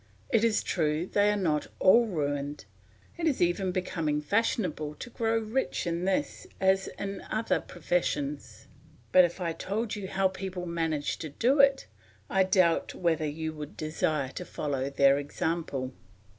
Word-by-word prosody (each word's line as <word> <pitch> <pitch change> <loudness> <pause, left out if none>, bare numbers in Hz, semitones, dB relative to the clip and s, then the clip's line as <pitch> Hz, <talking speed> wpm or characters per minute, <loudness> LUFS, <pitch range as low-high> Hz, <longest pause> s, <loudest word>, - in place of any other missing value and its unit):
It 225 - +3
is 230 -2 +2
true 155 -1 0
they 205 +2 +2
are 210 - +1
not 155 -6 0
all 230 +5 +6
ruined; 145 - -2 0.5
it 330 - +1
is 290 - +1
even 180 +2 +1
becoming 165 -5 -1
fashionable 155 -4 0
to 245 - -8
grow 225 0 0
rich 225 +4 -1
in 170 +1 -1
this 190 0 -1
as 190 0 +3
in 195 -1 -4
other 220 +1 +1
professions; 295 - -2 0.5
but 185 -1 +8
if 175 +2 -5
I 170 -2 -1
told 210 +6 -3
you 200 -2 -5
how 190 0 +2
people 190 -1 -5
manage 165 -3 -1
to 155 - -5
do 245 - +2
it, 275 -1 +5 0.5
I 195 -1 +4
doubt 185 -3 +2
whether 160 -3 +1
you 160 +1 -4
would 150 -1 -8
desire 155 -3 -1
to - - -6
follow 140 -2 -3
their 140 0 +4
example. 145 -3 -3
180 Hz, 155 wpm, -29 LUFS, 150-205 Hz, 0.5 s, but